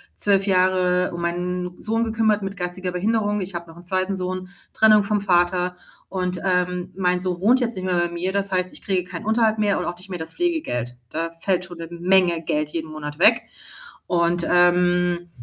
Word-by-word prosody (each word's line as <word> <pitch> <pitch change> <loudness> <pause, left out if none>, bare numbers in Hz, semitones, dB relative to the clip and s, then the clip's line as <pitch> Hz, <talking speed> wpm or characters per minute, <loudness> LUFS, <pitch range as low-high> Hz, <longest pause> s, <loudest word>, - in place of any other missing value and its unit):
12 195 -1 +2
Jahre 185 -1 +2
um 170 - -5
meinen 180 +1 -3
Sohn 225 +1 0
gekümmert 220 -2 +1
mit 195 +1 -4
geistiger 180 0 -4
Behinderung. 210 +2 0
Ich 180 -1 -6
habe 170 0 -5
noch 165 - -13
'nen 175 - -14
2. 185 +2 -1
Sohn, 185 0 -4 0.2
Trennung 215 -1 +5
vom 205 0 0
Vater 180 -1 +2 0.3
und, 180 -1 -2
ähm, 180 -1 0
mein 180 -1 +1
Sohn 180 -2 -2
wohnt 245 +6 +4
jetzt 235 -2 -1
nicht 185 - -5
mehr 180 -1 +1
bei 175 0 0
mir. 175 +2 -2
Das 200 0 -2
heißt, 185 -1 0
ich - - -10
kriege 180 -2 -1
keinen 215 - -7
Unterhalt 220 0 +2
mehr 205 -1 +1
und - - -3
auch 175 - -4
nicht 185 +2 -14
mehr 180 - -4
das 160 0 -7
Pflegegeld. 300 - -1
Da 165 +1 -3
fällt 185 -2 0
schon 175 -2 -11
'ne 165 - -6
Menge 175 0 +2
Geld 150 -1 -1
jeden 160 0 -5
Monat 150 -1 -6
weg. 220 +7 +6 0.6
Und, 170 0 +1
ähm, 175 0 +3
180 Hz, 200 wpm, -22 LUFS, 175-195 Hz, 0.6 s, weg